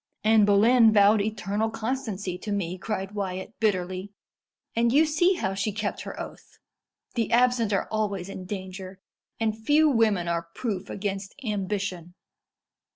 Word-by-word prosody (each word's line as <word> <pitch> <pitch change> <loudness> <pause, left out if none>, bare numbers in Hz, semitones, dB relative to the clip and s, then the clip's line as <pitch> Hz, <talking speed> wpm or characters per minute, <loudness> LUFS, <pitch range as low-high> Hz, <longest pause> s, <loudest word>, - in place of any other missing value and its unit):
"Anne 215 -1 +5
Boleyn 220 +3 +6
vowed 205 0 +5
eternal 215 +1 -1
constancy 220 -5 -3
to 210 +3 -6
me," 185 -3 -1
cried 195 0 -4
Wyat 190 -1 -4
bitterly; 185 -2 -1 0.6
"and 230 0 +3
you 300 +5 +5
see 350 +5 +3
how 190 - -2
she 200 +2 -1
kept 205 0 -3
her - - -7
oath. - - -9 0.6
The 230 -2 -1
absent 240 -2 +3
are 195 - 0
always 200 -4 -1
in 190 -1 -7
danger; 190 -1 -7 0.4
and 220 -1 0
few 295 +8 +3
women 215 -9 +2
are 170 0 -2
proof 205 -7 -3
against 195 -1 -4
ambition. 195 -4 -3
205 Hz, 145 wpm, -26 LUFS, 190-225 Hz, 0.6 s, Boleyn